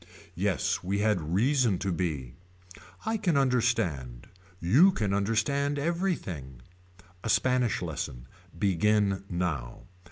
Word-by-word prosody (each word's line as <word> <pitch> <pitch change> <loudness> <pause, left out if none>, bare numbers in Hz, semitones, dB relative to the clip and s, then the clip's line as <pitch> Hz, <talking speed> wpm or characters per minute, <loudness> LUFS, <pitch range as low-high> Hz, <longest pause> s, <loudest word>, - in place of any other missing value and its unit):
Yes - - 0
we 95 +3 -1
had 105 -3 +1
reason 120 -2 +3
to 95 +1 -2
be. 75 -8 -3 0.7
I 220 +1 0
can 180 -8 +1
understand. 115 - 0 0.3
You 135 - +5
can 105 - -1
understand 115 +8 0
everything. 140 - -3 0.6
A 115 - -3
Spanish 125 -5 +2
lesson. 70 -7 -5 0.3
Begin 100 +2 +2
now. 85 -9 -3
105 Hz, 105 wpm, -28 LUFS, 85-130 Hz, 0.7 s, You